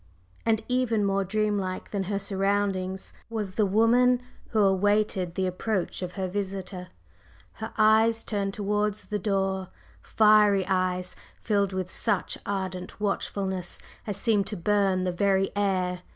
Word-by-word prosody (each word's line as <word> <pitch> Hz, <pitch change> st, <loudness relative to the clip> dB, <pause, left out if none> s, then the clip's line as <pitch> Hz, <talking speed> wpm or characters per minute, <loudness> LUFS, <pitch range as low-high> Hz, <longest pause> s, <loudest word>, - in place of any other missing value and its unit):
And 220 Hz, -1 st, +2 dB
even 250 Hz, -4 st, +1 dB
more 195 Hz, 0 st, +1 dB
dream 210 Hz, +1 st, 0 dB
like 185 Hz, -1 st, -4 dB
than 195 Hz, -2 st, -1 dB
her 200 Hz, +1 st, -1 dB
surroundings 195 Hz, -1 st, -1 dB, 0.2 s
was 210 Hz, -4 st, -3 dB
the 210 Hz, 0 st, +2 dB
woman 240 Hz, +5 st, +4 dB, 0.3 s
who 220 Hz, -, +1 dB
awaited 195 Hz, -2 st, +2 dB
the 190 Hz, -, 0 dB
approach 185 Hz, +1 st, -2 dB
of 180 Hz, -1 st, -4 dB
her 190 Hz, -2 st, -2 dB
visitor, 190 Hz, -1 st, -4 dB, 0.7 s
her 220 Hz, -, -4 dB
eyes 220 Hz, +1 st, +4 dB
turned 200 Hz, -2 st, -2 dB
towards 210 Hz, 0 st, -1 dB
the 210 Hz, -, -3 dB
door 190 Hz, -1 st, -1 dB, 0.3 s
fiery 210 Hz, -3 st, +4 dB
eyes 185 Hz, -1 st, -1 dB, 0.3 s
filled 200 Hz, -3 st, +1 dB
with 185 Hz, -1 st, -3 dB
such 205 Hz, -5 st, -1 dB
ardent 190 Hz, -2 st, -4 dB
watchfulness 190 Hz, -3 st, -2 dB, 0.3 s
as 205 Hz, -2 st, -2 dB
seemed 205 Hz, -2 st, +2 dB
to 210 Hz, -, -4 dB
burn 195 Hz, 0 st, +2 dB
the 185 Hz, -, 0 dB
very 195 Hz, +1 st, +1 dB
air. 185 Hz, -3 st, 0 dB
200 Hz, 140 wpm, -27 LUFS, 190-210 Hz, 0.7 s, woman